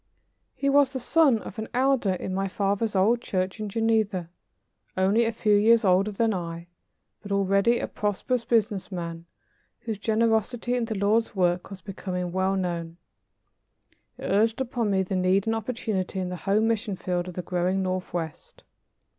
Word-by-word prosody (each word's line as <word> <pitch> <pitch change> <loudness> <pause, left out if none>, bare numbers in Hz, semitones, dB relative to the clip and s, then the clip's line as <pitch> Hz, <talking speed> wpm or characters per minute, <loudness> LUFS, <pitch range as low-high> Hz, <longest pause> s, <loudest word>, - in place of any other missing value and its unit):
He 280 - -2
was 280 -1 +4
the 260 - -2
son 280 -1 +4
of - - -8
an 220 - -4
elder 255 -6 +2
in 185 +1 -4
my 195 +1 -1
father's 200 +2 -1
old 220 +6 +3
church 185 0 -2
in 215 -1 -3
Geneva, 215 -5 0 0.7
only 200 +5 +3
a 225 - +1
few 215 -2 +1
years 220 +2 +5
older 190 +2 +4
than 220 +2 +1
I, 170 -2 -5 0.6
but 200 - -9
already 200 +4 +3
a - - -2
prosperous 210 +4 -1
business 210 -5 0
man 170 -2 -5 0.5
whose 220 -4 -4
generosity 225 +2 +1
in 245 -2 0
the 225 -1 -4
Lord's 210 +3 +1
work 180 -1 +1
was 195 -1 -9
becoming 180 -3 -4
well 190 +1 +1
known. 170 -3 -3 1.2
He - - -11
urged 220 +4 +2
upon 240 -4 -1
me 190 -1 +2
the 190 +1 -3
need 185 +1 +2
and 225 0 +1
opportunity 220 -5 -3
in 185 -1 -2
the 180 - -4
home 215 +3 +3
mission 220 -2 -1
field 180 -1 -2
of 180 - -8
the 180 - -4
growing 180 +2 0
northwest. 180 -3 -4
200 Hz, 170 wpm, -26 LUFS, 185-225 Hz, 1.2 s, years